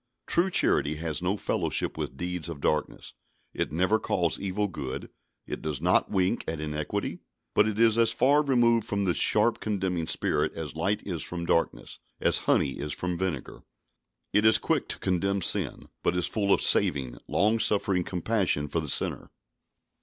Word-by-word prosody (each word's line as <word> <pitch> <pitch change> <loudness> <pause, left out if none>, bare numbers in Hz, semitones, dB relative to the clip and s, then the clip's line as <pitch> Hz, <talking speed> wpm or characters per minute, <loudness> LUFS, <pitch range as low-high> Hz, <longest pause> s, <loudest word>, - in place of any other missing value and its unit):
True 175 +3 +2
charity 75 - +3
has 80 0 -3
no 95 +3 -1
fellowship - - -1
with - - -5
deeds 90 -1 -4
of 80 -4 -7
darkness. 75 +1 -2 0.4
It - - -2
never 95 +7 +1
calls 85 -3 -1
evil 100 +2 -1
good, 70 -9 -6 0.3
it - - -6
does 75 -3 -2
not - - +3
wink 95 +3 0
at 80 - -3
iniquity, 75 0 -3 0.3
but - - +4
it 105 -1 -3
is 115 0 +4
as 115 -1 +5
far 140 +6 +3
removed 120 -5 +2
from 100 -1 -1
this 90 -3 0
sharp, 110 +2 +3
condemning 95 -6 -2
spirit 75 +1 0
as 80 -4 -6
light 95 +6 -1
is 85 -6 -4
from 85 +1 -5
darkness, 85 - -1 0.2
as - - +3
honey 70 - +2
is 75 0 -3
from 90 +3 -3
vinegar. 85 -7 -4 0.7
It 105 - +4
is 110 0 +6
quick - - -1
to - - -2
condemn 95 +1 -1
sin, - - 0
but 90 - 0
is 90 - +1
full 100 -2 -1
of - - +3
saving, 65 -4 +3
long 110 +3 +2
suffering 100 -4 +2
compassion 90 -5 -1
for 80 - -1
the 75 -2 -5
sinner. - - 0
90 Hz, 175 wpm, -27 LUFS, 80-105 Hz, 0.7 s, is